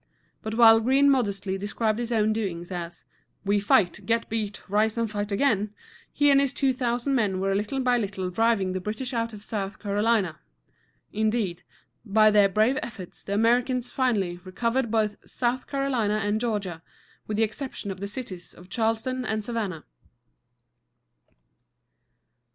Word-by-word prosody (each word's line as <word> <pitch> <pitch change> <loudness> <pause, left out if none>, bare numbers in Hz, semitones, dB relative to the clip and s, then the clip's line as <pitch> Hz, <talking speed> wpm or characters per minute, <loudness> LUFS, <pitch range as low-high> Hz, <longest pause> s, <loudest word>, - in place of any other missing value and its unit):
But 220 0 -4
while 225 -1 +8
Greene 270 +5 +4
modestly 200 -6 0
described 215 +2 -1
his 240 0 -3
own 215 -1 +2
doings 185 -5 -4
as, 175 -1 -6 0.4
"We 205 +1 +3
fight, 200 -2 +2
get 230 0 0
beat, 215 -3 -3
rise 215 +3 +1
and 230 0 +1
fight 205 -1 -4
again," 210 -2 +1 0.4
he 290 -1 +4
and 275 0 +6
his 275 -1 0
two 275 -2 +1
thousand 245 +1 -1
men 205 -7 +1
were 195 +1 0
little 210 +7 -1
by 250 -1 +2
little 195 -4 -3
driving 210 -2 +2
the 185 - -2
British 220 +7 -4
out 230 -1 -1
of 210 -2 -10
South 200 -2 -4
Carolina. 205 -4 0 0.7
Indeed, 215 -4 0 0.4
by 215 0 +4
their 205 -1 +5
brave 215 +7 +2
efforts 195 -7 -8
the 200 - -3
Americans 245 +3 +2
finally 205 -9 0
recovered 230 +6 -1
both 215 -2 +1
South 250 +1 -1
Carolina 260 -7 0
and 215 +1 0
Georgia, 200 -8 -2 0.5
with 210 - -2
the 225 - +3
exception 220 -2 -4
of 190 - -7
the 200 - -4
cities 200 -5 -7
of 180 +1 -15
Charleston 225 +4 -1
and 220 -3 -2
Savannah. 210 -9 -3
215 Hz, 155 wpm, -26 LUFS, 200-240 Hz, 0.7 s, while